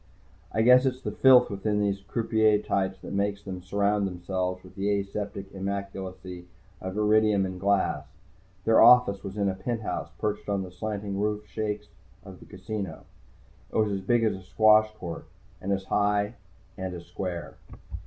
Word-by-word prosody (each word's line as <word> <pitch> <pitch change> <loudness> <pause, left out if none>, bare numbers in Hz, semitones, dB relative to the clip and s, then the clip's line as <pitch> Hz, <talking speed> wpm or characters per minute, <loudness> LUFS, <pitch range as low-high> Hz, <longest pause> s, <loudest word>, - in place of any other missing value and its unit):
I 110 - +1
guess 125 +2 +6
it's 130 0 -3
the - - -2
filth 130 -4 +6
within 105 +1 -1
these 100 -1 0
croupier 110 +1 +2
types 95 -2 -1
that - - -6
makes 100 0 -1
them 95 -2 -6
surround 100 +2 +1
themselves 90 0 -3
with 95 - -14
the 100 0 0
aseptic 100 0 -5
immaculacy 95 -2 -6 0.3
of 95 +2 -5
iridium 105 -2 +3
and 95 -1 -5
glass. 100 0 +1 0.6
Their 115 0 +5
office 125 -5 +6
was 100 0 -7
in 100 -1 +1
a 95 - +1
penthouse 110 +3 -3
perched 105 -1 -3
on 100 -1 0
the 90 - -9
slanting 100 +1 -4
roof 105 0 -1
shakes 105 -1 -3 0.4
of 95 -2 -11
the - - -14
casino. 100 +1 -6 0.7
It - - -11
was 105 -3 +1
big 115 +4 +2
as 110 - +2
a 95 - -9
squash 110 +3 +4
court, 85 -7 -7 0.3
and 100 - -3
as 95 -1 0
high 105 +2 +1 0.5
and 95 -1 -4
as 85 0 -9
square. 90 -3 -5
100 Hz, 165 wpm, -27 LUFS, 95-105 Hz, 0.7 s, guess